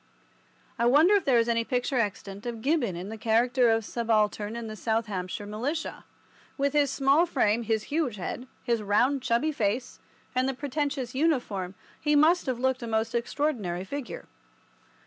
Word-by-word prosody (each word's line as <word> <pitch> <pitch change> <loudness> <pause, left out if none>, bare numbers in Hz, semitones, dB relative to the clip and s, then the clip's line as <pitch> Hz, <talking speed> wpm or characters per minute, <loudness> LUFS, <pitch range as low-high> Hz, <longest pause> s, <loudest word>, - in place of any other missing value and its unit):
I 235 - +3
wonder 305 +10 +6
if 405 - +3
there 260 -3 +4
is 230 0 +3
any 230 -1 +1
picture 250 +1 -1
extant 205 0 -3
of 230 -2 -5
Gibbon 275 - +1
in 180 +3 -6
the 220 0 -7
character 240 +3 +3
of 225 -1 +2
subaltern 215 -2 0
in 235 -1 -5
the 215 -1 -6
South 225 +1 0
Hampshire 190 0 -4
Militia? 255 +10 -4 0.5
With 280 0 +1
his 290 -2 +3
small 275 +5 +3
frame, 235 -7 +2
his 220 -1 0
huge 300 -8 0
head, 235 +6 -5 0.2
his 235 -3 0
round, 240 +7 +2
chubby 255 +5 +1
face, 235 -1 -2 0.3
and 255 +1 +1
the 270 - -3
pretentious 280 -2 -2
uniform, 245 - 0 0.2
he 295 -1 +2
must 315 +3 +4
have 255 -2 0
looked 260 +1 0
a 235 - -5
most 220 0 -1
extraordinary 235 - -1
figure. 280 +6 -6
240 Hz, 170 wpm, -27 LUFS, 220-275 Hz, 0.5 s, wonder